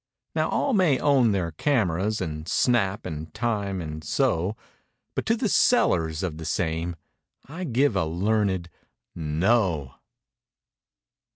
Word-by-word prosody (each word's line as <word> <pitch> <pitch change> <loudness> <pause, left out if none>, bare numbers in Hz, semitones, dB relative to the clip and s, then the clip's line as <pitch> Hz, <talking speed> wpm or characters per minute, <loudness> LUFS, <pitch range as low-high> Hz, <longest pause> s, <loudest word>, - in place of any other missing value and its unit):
Now - - 0
all 275 - 0
may 180 - +4
own 130 -6 +3
their 90 -4 -1
cameras 105 - 0
And 80 -2 -4
"snap" 110 -4 +1
and 80 +1 -6
"time" 105 -4 -1
and 80 -2 -6
so 90 +6 0 0.6
But - - -3
to 225 - +3
the 225 - 0
sellers 85 - +2
of 85 -4 -3
the 80 - -6
same 85 0 -1 0.5
I 170 +6 -6
give 130 -3 +2
a 95 - +1
learned—"No!" 85 - -1
95 Hz, 120 wpm, -25 LUFS, 80-120 Hz, 0.6 s, may